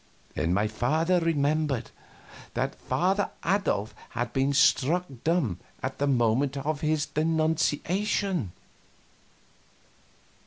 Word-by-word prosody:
Then 85 +3 -1
my 100 +4 +2
father 155 +11 +1
remembered 150 -6 0 0.6
that - - -1
Father 190 +3 0 0.2
Adolf 165 - 0 0.2
had 120 0 -3
been 135 +1 +2
struck 150 +4 +3 0.2
dumb 155 - +1 0.2
at - - -3
the 145 - +1
moment 130 +2 +2
of 145 +2 -2
his 155 -1 +1
denunciation. 160 - 0
150 Hz, 95 wpm, -27 LUFS, 125-165 Hz, 0.6 s, struck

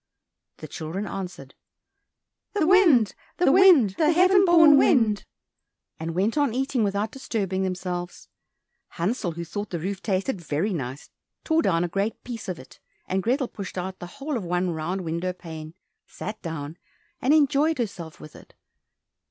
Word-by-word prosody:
The - - -9
children 165 +6 -5
answered, 180 -10 -7 1.0
"The 410 -6 +1
wind, 330 - +5 0.2
the 355 - +4
wind, 345 - +6
The 310 - +4
heaven 370 +3 +5
born 325 -4 +7
wind," 225 -8 +3 0.7
and 165 +1 -4
went 210 +10 +1
on 280 -5 +1
eating 265 -2 0
without 205 +2 -1
disturbing 200 -8 -3
themselves. 180 -1 -4 0.7
Hansel, 180 0 -1
who 170 +1 -6
thought 205 +4 -5
the 175 - -3
roof 190 +4 -4
tasted 195 +1 -1
very 165 +6 -1
nice, 135 -3 -6 0.3
tore 320 0 +2
down 170 - +1
a - - 0
great 200 +5 -2
piece 235 -5 -7
of 180 - -3
it, 130 - -14 0.3
and 190 +1 0
Grethel 255 +5 0
pushed 195 -4 -8
out 185 +1 -4
the 175 - -7
whole 280 0 -3
of 220 - -5
one 180 +1 -1
round 170 +4 -3
window 170 +2 -2
pane, 160 -2 -9 0.3
sat 215 0 -7
down, 160 -1 -6 0.4
and 270 +1 +2
enjoyed 300 +1 +3
herself 190 -9 -5
with 155 - -12
it. - - -16
195 Hz, 160 wpm, -25 LUFS, 175-270 Hz, 1.0 s, born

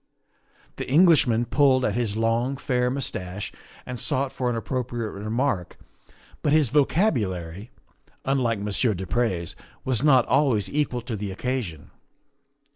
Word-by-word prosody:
The - - -5
Englishman 140 -7 +5
pulled 130 -1 +3
at - - 0
his 115 -3 -1
long, 115 +4 0
fair 125 -3 0
mustache 105 -8 -4 0.3
and 125 -1 -5
sought 135 +4 0
for 125 -1 -1
an 120 - -1
appropriate 120 -1 -3
remark, 110 -1 -2 0.6
but 145 - +1
his 150 -4 +4
vocabulary, 110 - 0 0.6
unlike 130 -4 +1
Monsieur 105 +2 0
du 95 +2 -5
Pre's, 95 -8 -1 0.3
was 130 -3 +1
not 135 -4 +5
always 130 -8 +2
equal 140 -4 -1
to 115 -1 -5
the 100 -1 -4
occasion. 100 - -4
120 Hz, 130 wpm, -25 LUFS, 105-135 Hz, 0.6 s, Englishman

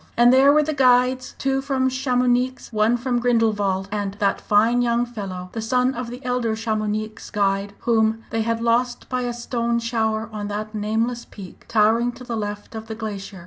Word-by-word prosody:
And 240 +1 +6
there 270 +2 +6
were 300 +1 +4
the 310 +1 -2
guides, 255 -1 +3
two 270 0 0
from 270 -1 0
Chamounix, 255 -1 0
one 215 +3 +3
from 245 0 -1
Grindelwald, 210 -5 +1
and 205 -2 -3
that 205 -1 0
fine 225 +4 +3
young 240 0 +1
fellow, 195 -6 -6
the 225 - -4
son 250 +3 +1
of 250 -1 -5
the 250 +2 -9
elder 245 -3 0
Chamounix 215 -1 -3
guide, 200 0 0
whom 225 -1 +1
they 225 - 0
had 230 +1 -1
lost 240 +1 +1
by 255 -1 -1
a 245 -1 -2
stone 235 0 -1
shower 225 -2 -1
on 205 -1 -4
that 210 +1 -5
nameless 225 +3 -1
peak 195 -3 -12
towering 230 +2 +3
to 245 +2 -11
the 240 -2 -4
left 205 0 -5
of 220 0 -7
the 220 - -5
glacier. 205 -3 -6
230 Hz, 185 wpm, -22 LUFS, 215-245 Hz, -, And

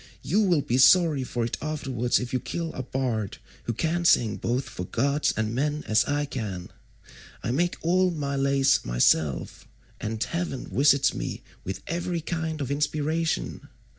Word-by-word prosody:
You 200 +7 +2
will 175 -8 +3
be 125 +2 0
sorry 155 -1 +6
for 120 -1 -2
it 115 - -4
afterwards 135 -6 0
if 125 +2 -5
you 130 - +2
kill 165 +6 -4
a - - -4
bard 125 -6 -2 0.3
who 120 - -1
can 165 +8 -1
sing 115 -10 +4
both 125 +3 -1
for 90 - -6
gods 140 +9 +1
and 110 0 -1
men 150 +4 -1
as 110 +2 +3
I 145 0 0
can. 105 -10 -5 0.7
I 115 - -1
make 175 +7 +1
all 185 +2 +3
my 145 -5 -3
lays 135 0 +3
myself, 65 +3 +1 0.3
and 110 +1 -2
heaven 170 -6 -3
visits 140 +4 +4
me - - -5 0.2
with 95 - -5
every 170 +1 -2
kind 160 -1 -3
of 135 -1 -3
inspiration. 155 +3 -1
140 Hz, 165 wpm, -26 LUFS, 120-160 Hz, 0.7 s, sorry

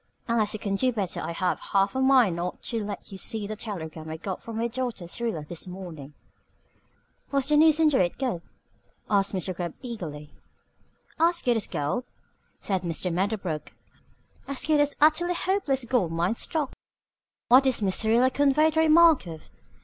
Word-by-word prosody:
Unless 225 -3 +1
you - - -5
can 200 -1 -2
do 255 +4 +2
better 200 -6 -3
I - - -4
have 180 +2 -1
half 195 0 +3
a 265 - -1
mind 260 -9 +4
not 175 +1 -4
to 230 -3 -2
let 205 0 -7
you 190 - -8
see 220 0 -2
the 215 +1 -5
telegram 160 -7 -6
I 160 - -5
got 185 +2 -5
from 230 -1 -7
my 230 +1 0
daughter 240 -6 -4
Syrilla 175 -6 -3
this 170 +2 -6
morning." 170 -6 -9 1.2
"Was 275 -2 +1
the 300 - +3
news 310 +1 +5
into 305 -4 +4
it 175 - -3
good?" 250 -11 -2 0.7
asked 200 -1 +2
Mr. 185 0 -2
Gubb 170 -2 -4
eagerly. 160 - -7 0.9
"As 335 +1 +2
good 245 -1 +2
as 220 - -2
gold," 150 - -2 0.5
said 190 -3 -2
Mr. 170 0 -2
Medderbrook. 185 -4 -2 0.7
"As 275 -1 -4
good 305 -1 +3
as 290 0 +2
Utterly 315 +4 +3
Hopeless 340 -10 0
Gold 235 -9 +1
Mine 170 +5 0
stock." 290 +4 -1 0.8
"What 255 +3 +7
did 260 -2 +3
Miss 190 -2 +1
Syrilla 235 +4 +3
convey 285 +3 +3
the 320 - 0
remark 320 - +5
of?" 160 -2 -10
220 Hz, 175 wpm, -26 LUFS, 180-270 Hz, 1.2 s, What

